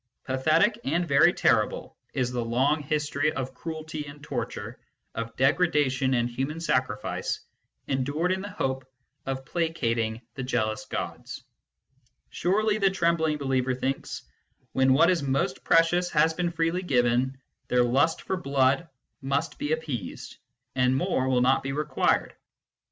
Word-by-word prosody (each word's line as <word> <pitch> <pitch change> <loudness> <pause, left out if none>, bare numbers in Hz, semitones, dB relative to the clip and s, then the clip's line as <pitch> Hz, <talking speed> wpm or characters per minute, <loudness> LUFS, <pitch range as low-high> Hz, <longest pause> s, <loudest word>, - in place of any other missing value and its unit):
Pathetic 155 - +2
and 170 +5 0
very 140 -2 +6
terrible - - +1 0.2
is 125 -2 0
the 120 -1 -1
long 130 +6 +1
history 150 0 0
of 130 -1 -4
cruelty 155 +1 -6
and 145 +1 -11
torture, - - -5 0.3
of 115 0 -5
degradation 135 -2 +2
and 120 -1 +1
human 135 +6 -3
sacrifice, 125 -9 -1 0.5
endured 145 +6 0
in 190 0 0
the 205 - -6
hope 130 -8 -3 0.4
of 135 0 -3
placating 115 -10 -1
the 135 - -6
jealous 110 -4 -1
gods: - - -5 0.9
surely, 210 +4 +1
the 195 -1 +4
trembling 170 -4 +1
believer 130 -2 0
thinks, 135 +2 -3 0.5
when 130 0 +3
what 145 +6 +5
is 180 - +1
most 135 -1 -1
precious 175 +2 +3
has 160 0 +3
been 175 +1 -1
freely 165 +1 0
given, 125 -4 +1 0.3
their 125 0 +3
lust 140 +7 +2
for 190 - -2
blood 135 0 +2 0.3
must 135 +1 -2
be 145 - -2
ap 160 0 +1
peased, 125 -9 -6 0.4
and 125 0 +2
more 135 -6 0
will 125 -1 +3
not 130 +2 +3
be 135 0 -3
required. 150 +1 +1
140 Hz, 140 wpm, -27 LUFS, 130-165 Hz, 0.9 s, very